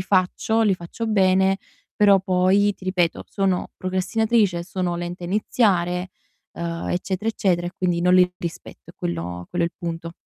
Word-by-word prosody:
faccio, 190 +4 +1
li 200 -3 +3
faccio 180 +6 -6
bene, 190 -2 +3 0.4
però 200 -2 +5
poi 190 +2 +3
ti 185 - -15
ripeto 180 -3 0
sono 195 -3 0
procrastinatrice, 190 0 +1
sono 180 -1 -2
lenta 175 +1 -5
a - - -4
iniziare, 180 -3 +1 0.4
uhm, 170 0 -4
eccetera, 190 +4 -2
eccetera 175 -5 0
e 175 - -5
quindi 175 -2 0
non 180 +1 +4
li 180 0 +5
rispetto 170 -1 -8
è - - -20
quello 85 +1 -4
quello 170 -1 +1
è - - -2
il - - -57
punto. 165 -1 -5
185 Hz, 165 wpm, -23 LUFS, 175-195 Hz, 0.4 s, però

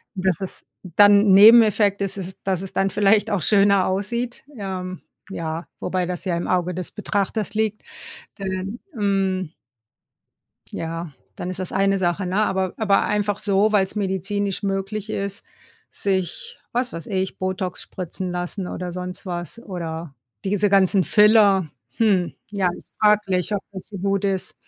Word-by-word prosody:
dass 185 -2 0
es 190 - -6 0.2
dann 205 +3 +5
Nebeneffekt 210 -1 +7
ist 195 0 0
es 185 0 -7
dass 190 -2 0
es 195 - -5
dann 195 0 +1
vielleicht 205 +1 +3
auch 200 -3 0
schöner 200 -2 +4
aussieht, 235 +6 -2
ähm, 185 -3 -5 0.3
ja, 165 -2 -4
wobei 180 0 -1
das 180 +1 -4
ja 180 -3 0
im 170 - -3
Auge 180 0 0
des 180 0 -3
Betrachters 210 0 -2
liegt, 215 -1 -1 0.6
denn, 195 +3 -4
hm 195 - 0 1.2
Ja, 165 -1 -5 0.2
dann 180 - -4
ist 185 - -4
das 185 - -3
eine 195 +1 +2
Sache 180 +1 0
ne? 185 - -2
Aber 190 -2 -1
aber 200 -3 +3
einfach 205 -1 0
so, 205 0 +2
weil's 195 -1 +2
medizinisch 200 0 -1
möglich 200 +2 -3
ist, 200 -1 -3 0.5
sich 200 - -3
was 245 0 -1
weiß 165 - -7
ich, 190 -1 -2
Botox 185 -1 -3
spritzen 185 0 -5
lassen 180 +2 -3
oder 180 0 -5
sonst 180 +2 -6
was 175 +3 -5
oder 165 - -6 0.3
diese 200 +1 +1
ganzen 195 -1 +4
Filler. 210 -5 +5 0.3
Hm, 195 -6 +2 0.2
ja, 195 -3 +1
ist - - -12
fraglich, 210 -2 +2
ob 200 - -1
das 190 -2 -9
so 200 - -7
gut 195 +1 0
ist. 195 -2 -1
195 Hz, 155 wpm, -22 LUFS, 185-205 Hz, 1.2 s, Nebeneffekt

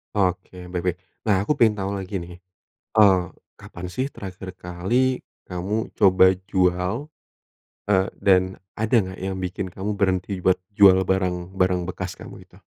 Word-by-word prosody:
Oke. 90 -2 -1
Baik 90 -1 -3
baik. 90 -1 0 0.3
Nah, 100 -2 +3
aku - - -1
pengen 110 -3 +5
tahu 95 +1 -2
lagi 95 +1 -6
nih. 85 0 -10 0.6
Eee, 100 -4 +6 0.4
kapan 90 +1 -8
sih 130 +8 -2
terakhir 95 -3 -8
kali 105 +10 0 0.3
kamu 100 +5 -3
coba 95 -2 +6 0.2
jual? 95 - 0 0.8
Eee, 95 -1 +4 0.2
dan 95 -2 +5 0.4
ada 110 +3 0
nggak 95 0 -7
yang 95 0 -3
bikin 95 +1 -3
kamu 100 +1 -4
berhenti 95 0 0
buat 90 0 +2 0.2
jual 95 -2 +7
barang-barang 90 0 0
bekas 95 - -5
kamu - - -12
itu? - - -21
95 Hz, 145 wpm, -23 LUFS, 90-100 Hz, 0.8 s, jual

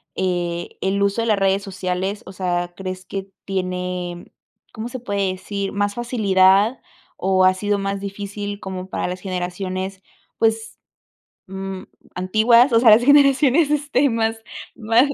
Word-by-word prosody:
eh, 175 -2 -2
el 195 +1 0
uso 200 +3 +1
de 230 - -2
las 210 -3 +2
redes 195 +1 +2
sociales? 190 +1 -3
O 190 - -9
sea, 175 -1 -2
¿crees 185 -1 -6
que 195 0 -6 0.2
tiene, 180 -2 -4 0.4
cómo 220 +2 -5
se 255 +1 -6
puede 200 -4 -1
decir, 200 +1 -4
más 205 0 -1
facilidad 210 -2 +3 0.4
o 185 0 +2
ha 185 - +5
sido 205 +2 -1
más 195 0 -2
difícil 205 0 -5
como 190 -1 -6
para - - -2
las 180 0 -5
generaciones, 185 +1 -4 0.4
pues, 225 0 0 0.7
mm, 190 0 -6 0.3
antiguas, 220 +7 +4
o 230 - +5
sea, 240 - +5
las 225 +3 +6
generaciones, 285 +1 +5
este, 290 -2 +2
más 225 -1 -1 0.3
má 225 +1 +2
195 Hz, 145 wpm, -21 LUFS, 185-225 Hz, 0.7 s, las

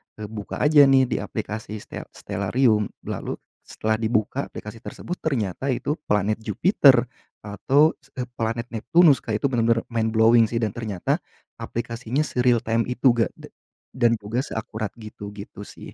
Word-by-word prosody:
eee, 105 -1 -7
buka 105 -2 -6
aja 150 -1 +7
nih 135 -1 +5
di 115 - 0
aplikasi 110 0 -5
ste - - -8
Stellarium 105 +2 +1 0.2
lalu - - -4 0.3
setelah 110 0 -2
dibuka 110 +4 0
aplikasi 110 +2 -8
tersebut 180 - -6
ternyata 130 - -1
itu 145 +4 -1
planet 105 +1 +2
Jupiter, 125 - +4 0.4
atau 135 +9 +3
se - - -26 0.3
planet 115 +1 -2
Neptunus 145 +5 +4
kayak 110 -1 -2
itu - - +4
bener-bener 115 -1 +2
mind 110 -1 0
blowing 115 +1 +6
sih 115 +1 -2
dan 105 - 0
ternyata, 110 -6 -2 0.4
aplikasinya 120 +4 -3
se-realtime 120 -4 +1
itu 125 +1 +3
enggak 115 -3 0
da - - -12 0.5
dan 120 -2 +3
juga 105 +4 -3
seakurat 110 -5 -4
gitu 105 -2 -9
gitu 100 0 -10
sih. - - -12
115 Hz, 150 wpm, -24 LUFS, 110-125 Hz, 0.5 s, aja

